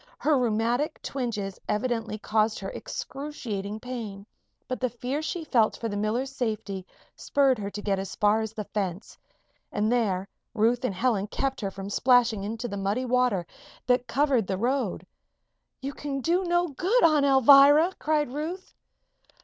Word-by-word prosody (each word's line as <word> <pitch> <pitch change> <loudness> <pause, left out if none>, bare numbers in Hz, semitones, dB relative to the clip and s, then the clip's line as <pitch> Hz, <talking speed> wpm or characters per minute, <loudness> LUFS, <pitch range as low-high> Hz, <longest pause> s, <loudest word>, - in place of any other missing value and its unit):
Her 305 0 +2
rheumatic 245 +5 0
twinges 220 -7 -3
evidently 225 0 -1
caused 215 +1 +1
her 195 - -5
excruciating 220 -8 -5
pain, 220 -6 -6 0.4
but 255 - -3
the 255 - 0
fear 250 +5 -3
she 320 +2 -3
felt 235 -8 +2
for 230 - -3
the 205 - -4
miller's 225 +6 -1
safety 215 -7 -3 0.3
spurred 270 -4 +2
her 200 -1 -3
to 205 +1 -7
get 195 -2 0
as 195 -1 -5
far 210 +1 +3
as 220 -1 -4
the 220 -1 -5
fence. 195 -2 -4 0.6
And 215 +2 0
there 200 -6 +1 0.3
Ruth 235 +3 +2
and 210 -7 -1
Helen 210 -1 +1
kept 270 +4 -2
her 200 - -1
from 195 +1 -7
splashing 245 -4 +3
into 225 +4 -4
the 200 -3 -5
muddy 200 +6 -1
water 250 -7 +1 0.4
that 250 0 +2
covered 270 -7 +2
the 190 - -1
road. 255 +6 -1 0.8
"You 275 +1 -3
can 280 -1 -4
do 350 +6 +1
no 350 0 +1
good, 380 - +1
Aunt 310 -3 +5
Alvirah!" 280 +5 +7
cried 300 -4 0
Ruth. 330 +6 -5
240 Hz, 160 wpm, -27 LUFS, 210-275 Hz, 0.8 s, Alvirah